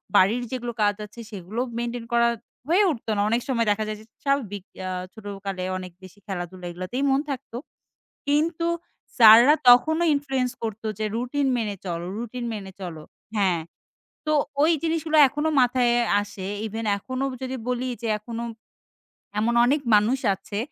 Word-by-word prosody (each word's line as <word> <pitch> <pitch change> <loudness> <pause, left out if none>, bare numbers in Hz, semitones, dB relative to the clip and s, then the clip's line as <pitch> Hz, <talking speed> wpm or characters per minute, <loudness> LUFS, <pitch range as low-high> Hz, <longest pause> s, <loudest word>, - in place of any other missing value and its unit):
বাড়ির 220 +6 +4
যেগুলো 240 -2 -3
কাজ 205 0 +3
আছে 215 +3 -14
সেগুলো 200 +3 -6 0.2
মেইনটেইন 235 0 -3
করা 235 0 +4 0.4
হয়ে 370 +5 +5
উঠত 235 -7 -7
না। 205 - +1
অনেক 230 +2 +1
সময় 235 -4 +1
দেখা 210 +1 0
যায় 215 0 -4
যে - - -16 0.2
স্বাভাবিক 245 -9 -1 0.2
আ - - -3 0.2
ছোটকালে 200 -3 -6
অনেক 185 -1 -7
বেশি 185 +2 -13
খেলাধুলা 180 -1 -5
এগুলোতেই 185 +10 -4
মন 270 0 +3
থাকতো। 250 -3 -5 0.7
কিন্তু 320 +3 +1 0.5
স্যাররা 235 +5 +9
তখনো 315 +7 +6
ইনফ্লুয়েন্স 270 -3 -1
করতো 220 0 -4
যে 215 - 0
রুটিন 255 +4 0
মেনে 215 -3 -2
চলো, 170 -1 -3
রুটিন 240 +1 -5
মেনে 195 -3 -6
চলো, 165 -4 -6 0.3
হ্যাঁ, 185 -5 +2 0.7
তো 305 - +2 0.3
ওই 320 - +5
জিনিস 325 0 +1
গুলো 310 0 +3
এখনো 295 +4 -1
মাথায় 245 -1 +3 0.3
আসে 200 -2 -7 0.2
ইভেন 220 +1 -5
এখনো 255 +6 -3 0.2
যদি 260 0 -3
বলি 250 +1 -1
যে - - -1
এখনো 230 +2 -6 1.0
এমন 230 +3 +1
অনেক 280 +4 +2
মানুষ 220 +6 +3 0.2
আছে। 195 +1 -7
235 Hz, 155 wpm, -25 LUFS, 205-260 Hz, 1.0 s, স্যাররা